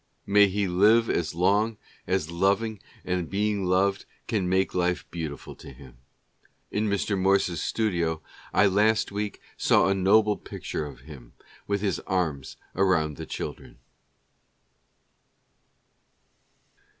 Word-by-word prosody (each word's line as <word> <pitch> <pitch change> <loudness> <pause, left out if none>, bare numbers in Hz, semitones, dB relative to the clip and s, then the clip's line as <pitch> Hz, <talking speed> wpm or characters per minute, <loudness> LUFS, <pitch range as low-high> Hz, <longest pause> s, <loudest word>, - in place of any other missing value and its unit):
May 100 0 +5
he 100 +1 -1
live 105 +6 +4
as 80 -1 -1
long 100 +5 +2 0.3
as 90 -4 -1
loving 100 +4 0 0.2
and 90 -2 -2
being 100 -1 0
loved 95 +2 +1 0.2
can 95 -5 0
make 95 +1 +1
life 90 0 0
beautiful 80 -5 -6
to - - -11
him! 65 -2 -15 0.7
In 105 +1 0
Mr. 100 0 0
Morse's 95 -3 +1
studio 85 -8 -1 0.3
I 105 - +4
last 105 +3 +2
week 105 0 -4 0.2
saw - - +3
a - - +3
noble 105 +2 +3
picture 75 - -5
of 70 - -12
him 65 -4 -13 0.3
with 100 -1 -1
his 100 -2 -1
arms 80 -8 -2 0.2
around 85 -6 +1
the - - -7
children. - - -7
95 Hz, 125 wpm, -26 LUFS, 85-105 Hz, 0.7 s, May